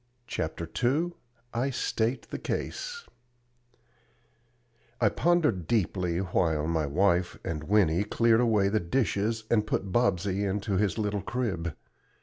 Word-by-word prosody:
CHAPTER 80 -6 -3 0.2
II 150 +8 +2 0.4
I 125 +4 0
STATE 120 -1 -1
THE - - -4
CASE 475 -2 -4 1.9
I - - +4
pondered 155 - +1
deeply 90 -5 0
while 85 -4 +1
my 80 -2 0
wife 90 +3 +2
and 75 -2 -3
Winnie 95 -1 +3
cleared 115 +2 +3
away 110 -5 +3
the 110 +2 +2
dishes 110 +2 0
and 110 -2 +3
put 95 -3 -1
Bobsey 100 -3 +1
into 100 0 -1
his 100 +1 +1
little 105 -2 -1
crib. 95 - -2
100 Hz, 125 wpm, -28 LUFS, 85-115 Hz, 1.9 s, I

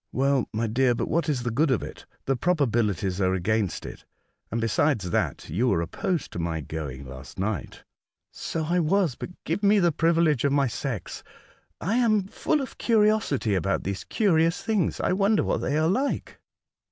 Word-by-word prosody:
'' - - -55
Well, 135 -1 +1
my 110 +2 -1
dear, 120 +2 +2
but - - -2
what 170 0 0
is 130 -5 0
the 120 - -1
good 150 +7 +2
of 130 - +1
it? - - -9 0.2
The 135 - +1
probabilities 115 - 0
are 95 0 +2
against 105 +1 -1
it; - - -9 0.5
and, 115 - -2
beside 115 +6 +2
that, 90 -2 -2
you 110 +11 0
were 85 - +2
opposed 170 - -2
to - - -5
my 85 -1 -2
going 70 -3 -6
last 65 +1 -10
night." 100 +3 -3 0.2
" - - -64
So 165 - -4
I 175 +3 +1
was; 175 -1 +2
but - - -7
give 170 +6 -2
me 205 +1 +5
the 175 -3 +4
privilege 165 -3 +2
of 140 -1 +2
my 140 -1 +3
sex. 120 - -4 0.6
I 205 +7 0
am 215 -5 +3
full 290 +9 -1
of 265 - -7
curiosity 215 - +2
about 95 +1 0
these 100 0 -3
curious 175 -2 +1
beings. 210 -7 0
I - - +1
wonder 200 +3 +2
what - - 0
they 145 +4 -1
are 155 +1 +2
like." 265 +11 -1
140 Hz, 190 wpm, -26 LUFS, -, 0.6 s, me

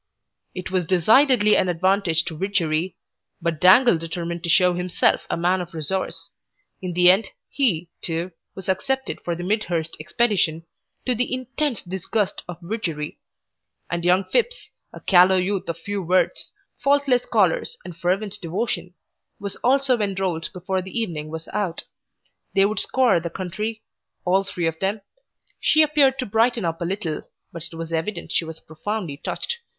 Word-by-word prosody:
It 185 0 -5
was 185 -3 0
decidedly 215 - +5
an 185 - +2
advantage 180 -1 +2
to 160 - -5
Widgery, 175 -2 0 0.4
but 165 -3 -2
Dangle 190 +1 +6
determined 170 +1 -4
to 170 - -3
show 180 +1 +5
himself 180 0 +1
a - - 0
man 180 +2 +2
of 175 -1 -8
resource. 165 +5 -3 0.5
In 180 -2 -3
the 180 +1 +7
end 195 +2 +1 0.2
he, 185 - +1
too, 170 +2 -3 0.2
was 190 0 -9
accepted 265 +8 -1
for 170 - -2
the 175 - -6
Midhurst 180 -5 -1
Expedition, 170 -2 +1 0.4
to 255 - +3
the 245 +1 -1
intense 255 0 -2
disgust 190 +3 -2
of 175 -1 -6
Widgery; 170 -7 -4 0.7
and 170 0 -1
young 180 +2 +4
Phipps, - - -1 0.2
a - - -10
callow 185 0 +6
youth 185 0 -1
of 170 - -2
few 200 +4 -4
words, 185 - +1 0.3
faultless 275 -3 +3
collars, 480 -1 +2
and 175 - -8
fervent 195 +4 -1
devotion, 180 +1 -3 0.4
was 200 -1 -4
also 265 -1 +2
enrolled 190 -5 -1
before 185 +1 -2
the 190 +5 -6
evening 160 -9 -3
was 160 +1 -6
out. 190 -5 -2 0.7
They 195 0 +5
would 215 +2 +1
scour 255 -9 +3
the 170 +1 -4
country, 210 +6 -4 0.4
all 190 +2 +3
three 180 -3 -3
of 165 0 -1
them. 200 +2 -1 0.6
She 310 - +5
appeared 285 -3 +3
to 260 - -2
brighten 225 0 +2
up 165 0 -2
a - - 0
little, 180 -4 -2 0.3
but 170 -1 -6
it - - -10
was 165 0 -6
evident 170 +3 -3
she 170 - +1
was 160 0 -8
profoundly 165 -1 -5
touched. 475 - -4
185 Hz, 160 wpm, -23 LUFS, 170-215 Hz, 0.7 s, the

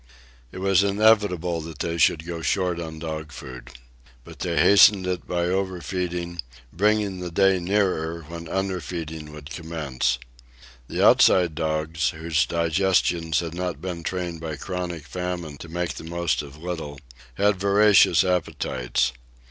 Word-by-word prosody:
It - - -10
was 95 0 +3
inevitable 100 -5 +2
that 80 -1 -9
they 85 +2 -3
should 80 0 +3
go 85 -1 -5
short 90 0 0
on 80 -2 -6
dog 80 -1 -5
food. 65 -3 -10 0.5
But - - -13
they - - -1
hastened 100 -1 +6
it 90 -1 -3
by 90 -1 -1
overfeeding, 90 -2 -2 0.3
bringing 105 0 +1
the 90 -1 -4
day 95 +2 +3
nearer 85 -3 0
when 85 0 -8
underfeeding 85 -5 -4
would 75 0 -11
commence. 75 -7 -2 0.7
The - - +1
Outside 90 -3 +5
dogs, 80 +1 -1
whose 80 0 +1
digestions 85 -1 +1
had 85 -1 -5
not 90 -4 -3
been 90 0 -5
trained 85 -2 -4
by 80 -2 -4
chronic 85 0 -5
famine 85 0 -5
to 85 - -10
make 85 +1 -2
the - - -9
most 85 0 -1
of 70 0 -11
little, 80 -4 -6 0.4
had 100 -1 +2
voracious 100 -3 +5
appetites. 65 -8 -1
85 Hz, 140 wpm, -24 LUFS, 80-90 Hz, 0.7 s, hastened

